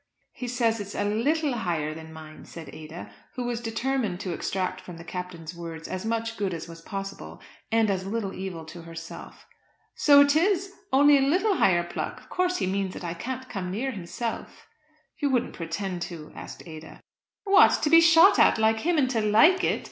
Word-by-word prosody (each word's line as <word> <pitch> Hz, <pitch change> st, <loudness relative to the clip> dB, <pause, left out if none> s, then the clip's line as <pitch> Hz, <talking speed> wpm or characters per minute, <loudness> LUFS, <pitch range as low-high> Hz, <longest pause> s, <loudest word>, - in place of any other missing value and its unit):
"He 250 Hz, -, -7 dB
says 235 Hz, -2 st, +1 dB
it's 205 Hz, 0 st, -7 dB
a -, -, 0 dB
little 280 Hz, +8 st, +1 dB
higher 170 Hz, -9 st, -2 dB
than 160 Hz, 0 st, -10 dB
mine," 155 Hz, -1 st, -11 dB
said 165 Hz, -3 st, -10 dB
Ada, 155 Hz, +2 st, -9 dB, 0.2 s
who 250 Hz, -, -3 dB
was 240 Hz, -1 st, -3 dB
determined 230 Hz, -4 st, -2 dB
to 185 Hz, -3 st, -3 dB
extract 185 Hz, +3 st, -3 dB
from 175 Hz, -2 st, -10 dB
the 165 Hz, -, -10 dB
Captain's 175 Hz, -2 st, -7 dB
words 165 Hz, -1 st, -7 dB
as 185 Hz, +3 st, -4 dB
much 225 Hz, 0 st, -2 dB
good 195 Hz, -3 st, -1 dB
as 165 Hz, -, -7 dB
was 165 Hz, 0 st, -11 dB
possible, 195 Hz, +2 st, -7 dB, 0.3 s
and 225 Hz, -1 st, +3 dB
as 190 Hz, -2 st, -1 dB
little 200 Hz, 0 st, -3 dB
evil 185 Hz, -4 st, -6 dB
to 170 Hz, +2 st, -10 dB
herself. 165 Hz, 0 st, -10 dB, 0.5 s
"So 285 Hz, -1 st, +6 dB
it 285 Hz, 0 st, +4 dB
is; 385 Hz, +3 st, +1 dB, 0.2 s
only 285 Hz, +1 st, +6 dB
a 270 Hz, 0 st, +2 dB
little 380 Hz, +4 st, +2 dB
higher 175 Hz, -2 st, +3 dB
pluck! 175 Hz, -, -5 dB
Of -, -, -20 dB
course 365 Hz, 0 st, 0 dB
he -, -, -1 dB
means 190 Hz, 0 st, -2 dB
that -, -, -8 dB
I 170 Hz, -1 st, -3 dB
can't 255 Hz, +9 st, -6 dB
come 185 Hz, -5 st, -5 dB
near 235 Hz, +8 st, -2 dB
himself." 215 Hz, +3 st, -6 dB, 0.5 s
"You 285 Hz, -, +1 dB
wouldn't 250 Hz, -3 st, 0 dB
pretend 175 Hz, +2 st, -4 dB
to?" 160 Hz, -3 st, -9 dB
asked -, -, -9 dB
Ada. 160 Hz, -1 st, -11 dB, 0.4 s
"What! 400 Hz, +1 st, +6 dB
to 300 Hz, -, +2 dB
be 330 Hz, 0 st, +9 dB
shot 330 Hz, +4 st, +7 dB
at -, -, +5 dB
like 220 Hz, 0 st, +2 dB
him, 340 Hz, +6 st, +1 dB
and 275 Hz, -3 st, +3 dB
to 225 Hz, -4 st, +1 dB
like 225 Hz, -, +5 dB
it. -, -, +1 dB
205 Hz, 200 wpm, -26 LUFS, 175-265 Hz, 0.5 s, be